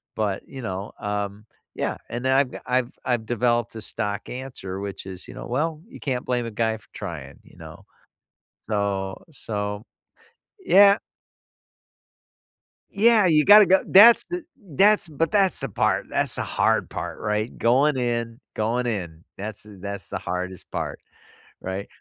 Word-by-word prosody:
but, 105 -3 -1
you 135 -1 -8
know, 95 -2 -5
um 105 0 -4 0.3
Yeah, - - -2
and 120 +2 -4
then 130 - +3
I've 135 -2 +2
I've 125 -1 0
I've 120 -3 -1
developed 120 0 0
a 110 - -6
stock 105 -2 -4
answer, 125 -7 -6
which 100 -1 -6
is 95 -1 -8
you - - -10
know, - - -8
"Well, 155 +5 -1
you 260 - -12
can't 125 -3 -3
blame 125 -1 -1
a 115 - -5
guy 110 0 0
for 105 - -23
trying, 80 -9 -7
you - - -20
know" - - -12 0.9
So 100 -2 -1
so 105 -6 -4 0.8
Yeah. 200 - +6 1.9
Yeah, 215 0 +5
you 155 -3 +4
gotta 210 0 +9
g 190 - +5
that's 225 +5 +8
th 355 -1 -5
that's 205 - +2
but 160 +2 -1
that's 195 -3 +3
the - - -1
part - - 0
that's - - -1
the - - 0
hard - - +1
part, - - -5
right? 105 +2 -2
Going 135 +5 +3
in 120 -1 -2
going 120 +3 0
in. 85 -7 -4
That's 105 +1 -6
the 105 -1 -13
that's 100 0 -6
the - - -3
hardest 90 0 -5
part. - - -4 0.6
Right? 95 +2 -4
115 Hz, 160 wpm, -24 LUFS, 100-145 Hz, 1.9 s, gotta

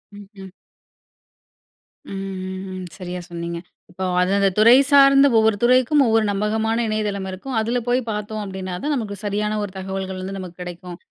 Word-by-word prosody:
ம்ஹ்ம். 195 -2 -12 1.6
ம்ஹ்ஹ்ம். 190 -1 -6
சரியா 180 -1 -6
சொன்னீங்க. 170 0 -5 0.3
இப்போ 185 +1 -4
அது 180 +1 +2
அந்த 200 -1 +3
துறை 230 +3 +8 0.2
சார்ந்த 275 0 +7
ஒவ்வொரு 220 -1 +3
துறைக்கும், 255 +4 +4
ஒவ்வொரு 225 -1 +3
நம்பகமான 220 +3 0
இணையதளம் 210 -3 -2
இருக்கும். 230 +7 -5
அதுல 235 +2 -1
போய் 245 +1 +2
பாத்தோம் 210 0 -4
அப்படீன்னா 190 -2 -5
தான், 295 0 0
நமக்கு 210 -5 -4
சரியான 210 +1 -1
ஒரு 195 -2 -6
தகவல்கள் 190 0 -5
வந்து 195 +1 -5
நமக்கு 180 -2 -9
கெடைக்கும். 175 0 -8
200 Hz, 145 wpm, -21 LUFS, 185-220 Hz, 1.6 s, துறை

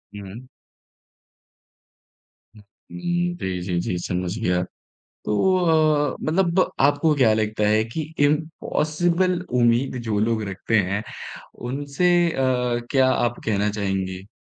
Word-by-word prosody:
हुँ। 100 +5 -9 2.1
हुँ 105 - -15
उम, 175 - -4
जी, 95 -1 -3
जी, 90 -1 -2
जी 90 - -2
समझ 90 +3 -2
गया। 90 -5 +1 0.6
तो 185 - +2 0.6
अ, - - -9
मतलब 175 +2 +1
आपको 145 +3 +3
क्या 125 -6 +4
लगता 110 0 -1
है 110 +1 +3
कि 115 +8 -4 0.2
इम्पॉसिबल 165 +3 0 0.2
उम्मीद 120 +3 +2
जो 110 -3 -1
लोग 110 0 +1
रखते 95 +4 0
हैं, 100 +2 -2 0.7
उनसे 145 +6 -1 0.2
अ, - - -5 0.6
क्या 130 -2 +4
आप 120 0 0
कहना 105 -1 +1
चाहेंगी? 95 -2 -3
115 Hz, 115 wpm, -23 LUFS, 100-155 Hz, 2.1 s, क्या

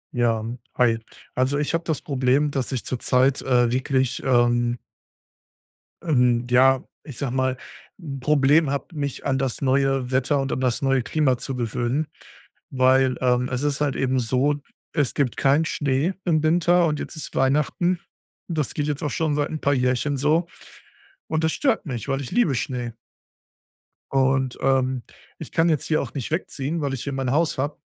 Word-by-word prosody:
Ja, 115 -2 +1 0.3
hi. 115 -2 +3 0.3
Also, 130 +3 +1
ich 150 +2 -1
habe 165 0 0
das 160 -3 -1
Problem, 135 +1 +1
dass 135 -2 -2
ich 130 -3 -3
zurzeit, 130 +2 +1
äh, 125 -2 +2
wirklich, 130 0 0
ähm 120 -2 +2 1.3
ähm, 125 -6 +3
ja, 130 +1 +4 0.2
ich 140 -6 -10
sage 130 -3 -3
mal, 130 -1 0 0.4
'n 140 -6 -6
Problem 150 +2 +3
habe, 140 0 -2
mich 140 -3 -4
an 135 -1 +1
das 135 -2 -2
neue 135 -1 +1
Wetter 135 +2 +1
und 135 - -3
an - - -1
das 125 -2 0
neue 135 -1 +2
Klima 135 -2 +1
zu 135 - -5
gewöhnen. 120 +5 -1 0.6
Weil, 130 0 +3
ähm, 125 0 +2
es 125 +1 -2
ist 145 0 -1
halt 145 -2 +1
eben 130 0 +1
so: 130 +5 +1 0.4
Es 145 -6 +1
gibt 135 -5 0
keinen 145 +4 +3
Schnee 145 +3 0
im 155 -4 +2
Winter 175 +2 +3
und 150 -2 -1
jetzt - - -6
ist 155 - -7
Weihnachten, 150 +6 +1 0.5
das 155 -6 -2
geht 145 -1 -2
jetzt 150 +2 -2
auch 150 - 0
schon 155 -3 0
seit 145 0 0
'n 155 - -4
paar 140 - +1
Jährchen 130 +2 0
so. 155 +5 +2 0.8
Und 160 0 -1
das 160 - +2
stört 265 -10 0
mich, 120 -7 -5
weil 135 0 0
ich 130 - -6
liebe 230 - +2
Schnee. 120 -1 -3 1.2
Und, 135 -1 +1
ähm, 130 -1 +1 0.4
ich - - -8
kann 165 +1 +2
jetzt 155 -4 0
hier 155 - +2
auch - - -7
nicht 135 -2 -5
wegziehen, 160 -1 -2
weil 140 -2 -1
ich 135 -1 -4
hier 140 - -4
mein 135 -2 -1
Haus 155 +3 +1
habe, 145 +3 -2
135 Hz, 180 wpm, -23 LUFS, 125-150 Hz, 1.3 s, ja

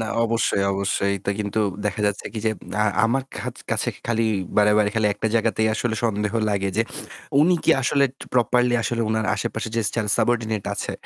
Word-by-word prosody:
না 110 - -2 0.2
অবশ্যই, 115 -3 +1
অবশ্যই। 100 0 0
এটা 100 - -3
কিন্তু 105 +1 -1 0.3
দেখা 105 0 -2
যাচ্ছে 105 0 -2
কি 110 - -4
যে - - +4 0.3
আ - - +2 0.2
আমার 130 +4 +1
কা - - -5 0.2
কাছে - - 0 0.2
খালি 115 -1 +1 0.3
বারেবারেই 105 0 +4
খালি 110 -1 +2
একটা 105 - -2
জায়গাতেই 110 -1 +2
আসলে 110 0 -1
সন্দেহ 105 -1 0 0.2
লাগে 100 -1 0
যে 115 - +4 0.6
উনি 180 +4 +5
কি - - +5
আসলে 140 +2 +3 0.3
প্রপারলি 125 0 +3
আসলে 115 +2 -1
উনার 110 0 0
আশেপাশে 110 +3 -3
যে - - +3
সেলস 105 -3 0
সাবঅর্ডিনেট 110 -4 0
আছে - - -3
110 Hz, 180 wpm, -23 LUFS, 105-115 Hz, 0.6 s, উনি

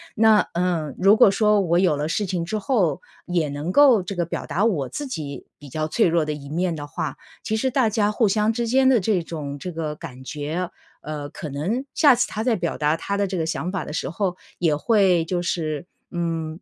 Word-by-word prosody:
那 220 -2 +5
嗯， 170 -5 -1
如 195 +3 +5
果 235 - +7
说 210 +1 +3
我 175 -3 +2
有 180 -5 +3
了 150 +1 -2
事 205 +6 -1
情 180 -3 -2
之 215 +5 -2
后， 195 - +1 0.2
也 170 -4 0
能 145 +5 -4
够 270 -7 +6
这 185 +2 -6
个 175 - 0
表 170 - -5
达 195 - -1
我 170 - +1
自 290 - -5
己 145 - -6
比 145 - -12
较 155 +3 -2
脆 220 +5 +3
弱 170 -1 +2
的 150 - -3
一 145 -2 -7
面 170 +4 -1
的 145 -1 -6
话， 155 -2 -4 0.3
其 220 - -1
实 260 +4 +1
大 255 -3 +2
家 210 -1 +1
互 210 0 +2
相 210 +2 +2
之 235 0 -2
间 260 +2 +4
的 255 -5 +4
这 185 -1 +1
种 150 -4 -6
这 180 - -5
个 160 -2 -3
感 130 -6 -9
觉， 155 +6 -3 0.3
呃， 150 -1 -5
可 150 +1 -7
能 180 - -2
下 285 -5 +6
次 - - +1
她 215 - -4
再 230 0 +2
表 175 -4 -2
达 150 +1 +2
她 200 +4 -3
的 200 - +1
这 185 0 -3
个 160 - 0
想 165 +2 -2
法 185 -3 -3
的 - - -7
时 155 - -3
候， 180 +1 -2 0.2
也 165 -4 +2
会 190 -3 +3
就 175 +1 -1
是， 160 -3 -2 0.3
嗯 165 -1 -3
175 Hz, 250 characters per minute, -23 LUFS, 155-210 Hz, 0.3 s, 果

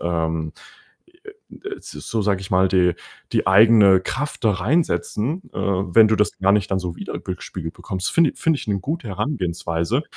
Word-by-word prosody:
ähm 80 -2 -2 0.7
e - - -16 0.4
ä - - -11
d - - -12
s - - -11
so 110 -2 -4
sage 100 -2 0
ich 95 - -9
mal, 95 +1 +4
die 90 -2 +2 0.4
die - - 0
eigene 100 -1 +6
Kraft 145 +7 -4
da 110 - +5
reinsetzen, 140 - -1
äh, - - -7
wenn 100 +2 +3
du 110 - +2
das 105 -4 0
gar 95 +1 +3
nicht 100 -2 +1
dann 95 - +1
so 90 -2 -5
wieder - - -6
gespiegelt 90 -2 -7
bekommst. 95 0 -4
Finde 165 -4 +3
finde 160 -3 +1
ich - - -9
'ne 100 -1 0
gute 145 - -4
Herangehensweise. 95 - -2
100 Hz, 190 wpm, -21 LUFS, 90-115 Hz, 0.7 s, eigene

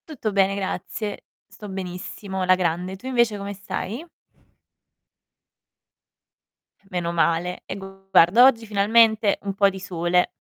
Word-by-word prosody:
Tutto 260 -9 -4
bene, 195 0 +2
grazie. 200 +2 -5 0.2
Sto 210 - -11
benissimo, 190 +1 -6
alla 185 0 +4
grande. 180 +1 -2
Tu 195 - -15
invece 235 -4 +1
come 200 0 -5
stai? 200 - -5 2.9
Meno 175 -2 -2
male. 170 +1 0
E 190 - -6
guarda, 195 +2 +3
oggi 235 -4 +5
finalmente 220 0 +3
un 200 -1 -3
po' 200 0 +4
di 190 0 -8
sole. 180 -1 0
195 Hz, 120 wpm, -23 LUFS, 180-210 Hz, 2.9 s, oggi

